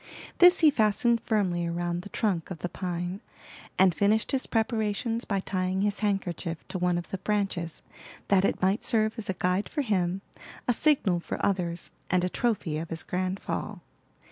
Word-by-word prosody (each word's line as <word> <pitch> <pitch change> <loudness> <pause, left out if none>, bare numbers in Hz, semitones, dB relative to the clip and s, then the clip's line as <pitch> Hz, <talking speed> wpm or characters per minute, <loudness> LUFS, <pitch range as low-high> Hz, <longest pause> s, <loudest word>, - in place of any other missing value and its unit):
This 355 0 +8
he 310 -2 +7
fastened 230 -1 +2
firmly 180 -6 0
round 175 0 -2
the 200 - -10
trunk 195 -8 -1
of 185 - -5
the 180 - -2
pine, 180 +2 -4 0.6
and 185 -2 +5
finished 210 +4 +2
his 265 -1 0
preparations 225 0 0
by 200 -2 -1
tying 185 0 -1
his 205 -1 0
handkerchief 185 -5 -2
to 185 - -3
one 180 -1 +2
of 175 - -6
the 195 - -3
branches, 195 -5 -2 0.4
that 195 -1 +4
it - - +1
might 195 +4 +2
serve 220 -1 +2
as 210 - -6
a - - +1
guide 180 +3 0
for 295 - -1
him, 190 -4 0 0.4
a 245 - +4
signal 230 - +2
for - - -5
others, 175 -3 -1 0.2
and 180 0 +2
a 180 - +1
trophy 185 -9 -1
of 165 - -6
his 160 -1 -3
grand 185 +1 -2
fall. - - -4
190 Hz, 180 wpm, -28 LUFS, 175-215 Hz, 0.6 s, This